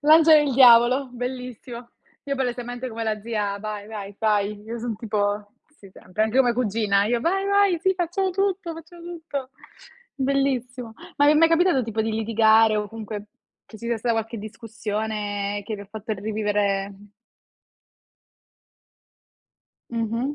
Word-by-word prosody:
L'angelo 315 +1 +7
e - - +1
il 275 -3 -1
diavolo, 250 +1 +6
bellissimo. 245 -1 -7 0.3
Io 280 - -2
palesemente 245 -1 -3
come 230 -1 -5
la 215 -1 -1
zia 205 -2 -2
"vai, 210 0 -6
vai, 205 -2 -7
fai", 210 -1 0
io 230 +2 -6
son 235 -1 -3
tipo 205 -1 -2 0.3
sì, 195 - -15
sempre, 185 +3 -4
anche 220 +3 -2
come 245 -2 +4
cugina, 210 -4 +1
io: 235 +3 0
"Vai, 390 +8 0
vai, 400 -3 +3
sì, 380 +1 +2
facciamo 365 +2 -1
tutto, 375 -3 -1
facciamo 335 +1 -12
tutto!" 320 -6 -6 0.6
Bellissimo. 260 -4 -1 0.2
Ma 290 - +4
vi 295 - +7
è - - +2
mai 325 +2 +5
capitato 330 -4 +3
tipo 225 -1 -3
di 220 - -1
litigare 220 0 +4
o 210 -1 -2
comunque 215 -2 -7 0.4
che 220 - -13
ci 235 - -7
sia 235 0 0
stata 230 +1 0
qualche 225 0 -3
discussione 210 -2 -4
che 215 +1 -4
vi 200 - -8
ha - - -14
fatto 220 +1 -5
rivivere, 205 -1 -1
mh 200 +1 -16 2.8
Mh-mh. 230 +4 -2
230 Hz, 155 wpm, -24 LUFS, 210-270 Hz, 2.8 s, L'angelo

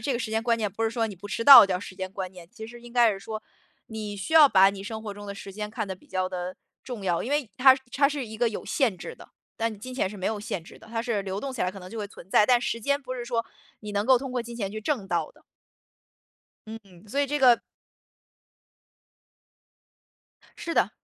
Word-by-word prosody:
这 255 +4 -1
个 - - -1
时 230 -2 -4
间 220 0 0
观 235 0 +2
念 210 -4 -2
不 220 - -4
是 225 - +2
说 230 0 -1
你 210 - -7
不 195 +3 -11
迟 230 - -3
到 275 -6 +11
叫 185 -2 -1
时 185 - -9
间 185 0 -5
观 190 -1 -6
念， 175 -2 -13
其 220 - -9
实 240 +1 -12
应 240 0 -13
该 235 -3 +4
是 195 - -6
说， 215 +2 -6 0.5
你 215 -2 -6
需 200 +11 -6
要 310 -3 +9
把 195 -4 +6
你 195 -1 -8
生 220 +2 -6
活 210 -2 -5
中 205 0 -10
的 200 - -6
时 195 0 -9
间 210 +1 -5
看 220 -1 -3
得 190 - -4
比 185 - -22
较 185 -1 -1
地 180 0 -5 0.3
重 240 -6 -7
要， 175 -3 0
因 250 - -5
为 290 -6 0
它 260 0 +7 0.2
它 280 +1 +4
是 285 -3 -3
一 220 -1 -9
个 240 0 +3
有 220 - -6
限 245 -10 +1
制 475 - -8
的。 - - -15 0.3
但 230 0 0
你 - - -10
金 255 +4 -8
钱 250 - 0
是 210 - -9
没 185 - -3
有 215 -1 -2
限 190 -5 -5
制 - - -14
的， 220 - -16
它 225 0 -3
是 230 -4 -1
流 195 0 -4
动 270 +5 -4
起 255 - -7
来 180 - +1
可 195 - -10
能 185 -1 -11
就 230 - -7
会 210 - -3
存 195 -3 -14
在， 210 - +5
但 245 0 +5
时 230 -1 -2
间 280 +5 0
不 255 -2 -6
是 245 -1 -5
说 230 -1 -1 0.4
你 210 -1 -7
能 205 +1 -1
够 260 -1 +6
通 265 0 -6
过 250 -1 -1
金 235 0 -9
钱 200 -4 -3
去 215 - -5
挣 230 -4 -2
到 200 - -1
的。 - - -24 1.2
嗯， 220 +1 -7 0.3
所 280 +7 -1
以 285 - +2
这 295 +2 -1
个 250 -3 +7 3.0
是 335 - -4
的。 - - +3
220 Hz, 280 characters per minute, -26 LUFS, 200-245 Hz, 3.0 s, 到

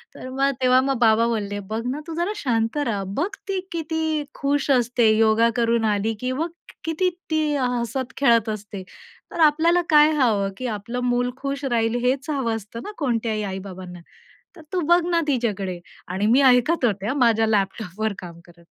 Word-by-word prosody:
तर 255 - -8
मग 275 +1 +1
तेव्हा 255 0 +5
मग 270 -1 0
बाबा 230 0 +4
बोलले, 205 -3 -2
"बघ 215 +3 -4
ना 275 +4 -2
तू 325 - -5
जरा 345 +4 -1
शांत 230 - -1
रहा. 230 -9 -1
बघ 290 - -2 0.2
ती 390 -1 -1
किती 320 -2 -2
खुश 285 0 -1
असते 240 -2 +3
योगा 225 +1 +4
करून 230 -1 +1
आली 210 +1 0
की 255 +2 -2
मग 315 +6 -2 0.3
किती 325 +3 0 0.2
ती 310 -2 +1
हसत 245 0 -2
खेळत 235 -5 +3
असते. 205 -2 -6 0.5
तर - - -7
आपल्याला 330 +4 +3
काय 300 0 +6
हवं? 220 -8 +2
की 255 - -4
आपलं 230 +2 -4
मूल 245 0 +1
खुश 275 +1 -4
राहील, 230 -3 +1
हेच 265 +4 0
हवं 260 -6 -1
असतं 220 +1 -8
ना 415 - -6
कोणत्याही 230 -6 -1
आई-बाबांना? 185 -2 -7 0.6
तर 325 - -13
तू 370 - +1
बघ 345 +1 +5
ना 340 -1 +2
तिच्याकडे" 205 -9 -1 0.3
आणि 190 +4 -1
मी 255 +5 +5
ऐकत 250 +4 +2
होत्या 205 +2 -1
माझ्या 230 -4 +3
लॅपटॉपवर 210 0 -1
काम 170 -2 -10
करत. 170 -1 -19
240 Hz, 175 wpm, -23 LUFS, 215-280 Hz, 0.6 s, काय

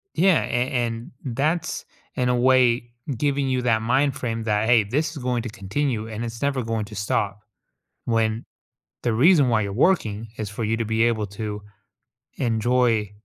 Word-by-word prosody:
Yeah, 185 -1 +4
an 125 +1 -1 0.5
and 125 -4 -4
that's, 155 +6 -1 0.3
in 125 -1 +1
a 125 - +3
way, 125 -1 +3 0.3
giving 140 0 0
you 130 -1 +1
that 115 -2 +2
mind 130 +4 +2
frame 115 -5 -3
that, 105 -1 +1
"Hey, 120 -2 +5
this 145 +9 -1
is 145 - -7
going 125 -1 0
to 120 - -4
continue 110 +3 -2
and 110 +1 -5
it's 115 0 -7
never 140 -3 0
going 110 -1 -2
to 105 - -11
stop," 105 -1 -1 0.6
when 115 -1 0 0.6
the 120 - +1
reason 145 +2 +5
why 110 -2 +2
you're 100 -1 -3
working 115 - +1
is 105 -2 -4
for 105 +3 -5
you 110 +1 0
to 115 - -1
be 110 +1 +1
able 110 -3 +1
to 105 0 -5 0.8
enjoy 115 -3 +1
115 Hz, 175 wpm, -23 LUFS, 110-130 Hz, 0.8 s, Hey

